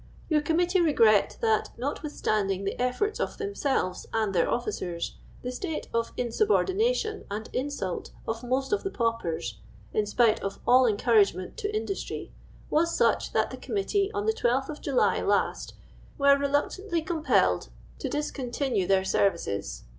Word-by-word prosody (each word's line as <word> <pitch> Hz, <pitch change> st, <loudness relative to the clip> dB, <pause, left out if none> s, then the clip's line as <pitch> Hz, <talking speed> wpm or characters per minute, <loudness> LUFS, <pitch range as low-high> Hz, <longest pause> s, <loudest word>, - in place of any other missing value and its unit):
Your 305 Hz, -2 st, +3 dB
Committee 350 Hz, +4 st, +2 dB
regret 225 Hz, -10 st, +4 dB
that, 220 Hz, -2 st, +2 dB
notwithstanding 215 Hz, -, -1 dB
the 195 Hz, -, -1 dB
efforts 250 Hz, +13 st, 0 dB
of -, -, -2 dB
themselves 280 Hz, -, -1 dB
and 215 Hz, -3 st, 0 dB
their 175 Hz, -, +2 dB
officers, 175 Hz, -8 st, -3 dB, 0.3 s
the 250 Hz, -, -3 dB
state 320 Hz, +5 st, -4 dB
of 230 Hz, 0 st, 0 dB
insubordination 425 Hz, -, +1 dB
and 210 Hz, +2 st, -4 dB
insult 255 Hz, -9 st, -3 dB, 0.2 s
of 225 Hz, +2 st, -3 dB
most 260 Hz, +6 st, 0 dB
of 415 Hz, -, +1 dB
the 390 Hz, -, -2 dB
paupers 170 Hz, -, -2 dB, 0.3 s
(in 210 Hz, -1 st, +1 dB
spite 220 Hz, +1 st, +3 dB
of 195 Hz, 0 st, -4 dB
all 255 Hz, +1 st, +6 dB
encouragement 205 Hz, -4 st, +2 dB
to 420 Hz, -3 st, -2 dB
industry) 410 Hz, -2 st, -4 dB, 0.4 s
was 335 Hz, +2 st, +2 dB
such, -, -, +2 dB
that -, -, +1 dB
the -, -, -6 dB
Committee, 400 Hz, -1 st, 0 dB
on 410 Hz, -1 st, -2 dB
the 440 Hz, -, +3 dB
12th 265 Hz, -, 0 dB
of 305 Hz, -, -6 dB
July 275 Hz, -3 st, +2 dB
lost, -, -, 0 dB, 0.4 s
were 280 Hz, 0 st, +6 dB
reluctantly 295 Hz, +6 st, -1 dB
compelled 265 Hz, -, +1 dB, 0.3 s
to -, -, -3 dB
discontinue 265 Hz, -7 st, -1 dB
their 190 Hz, -1 st, +3 dB
services. 170 Hz, -, 0 dB
255 Hz, 145 wpm, -27 LUFS, 210-335 Hz, 0.4 s, all